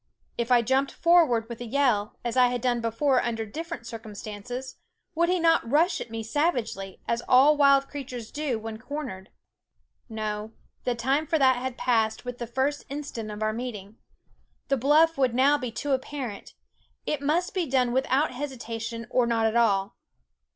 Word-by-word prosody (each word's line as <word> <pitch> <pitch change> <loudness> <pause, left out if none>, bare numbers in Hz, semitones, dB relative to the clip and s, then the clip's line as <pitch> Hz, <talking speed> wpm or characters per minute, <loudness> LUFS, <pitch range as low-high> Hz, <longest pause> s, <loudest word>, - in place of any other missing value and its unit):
If 235 +1 -2
I 240 -1 +5
jumped 265 +4 +1
forward 320 -10 +3
with 235 0 -8
a - - -4
yell, 235 -5 +1
as 235 - -2
I 250 -1 +6
had 245 0 -1
done 240 -1 +1
before 250 +4 +2
under 225 -2 -2
differ 330 - -5
ent 235 - -16
circumstances, 225 +3 -7 0.4
would 340 +1 +2
he 365 0 +2
not 330 -8 +3
rush 320 +7 +2
at - - -6
me 225 0 -5
savagely, 225 - -1
as 235 0 0
all 270 +4 +6
wild 275 -1 +5
creatures 250 -5 -7
do 290 -5 -2
when 220 0 -7
cor 290 +5 -5
nered? 190 -6 -8 0.8
No, 215 0 -4 0.3
the 245 - +1
time 270 +6 0
for 325 - +2
that 260 -3 +4
had 250 0 -4
passed 220 -2 +1
with 245 0 -6
the 235 - -4
first 265 +5 -1
instant 275 -6 -5
of 210 +1 -5
our 215 0 0
meeting. 220 -3 -6 0.7
The 275 - +2
bluff 300 +4 +4
would 255 -3 +2
now 280 +3 +4
be 250 -3 -4
too 285 +5 -4
apparent; 260 -5 -4 0.5
it 300 -2 -2
must 325 +6 0
be 360 -4 -1
done 255 -2 +2
without 265 +3 +1
hesitation, 235 -4 -5
or 245 -2 +3
not 230 -1 +1
at 220 +1 +1
all. 200 -4 +2
250 Hz, 180 wpm, -26 LUFS, 225-285 Hz, 0.8 s, I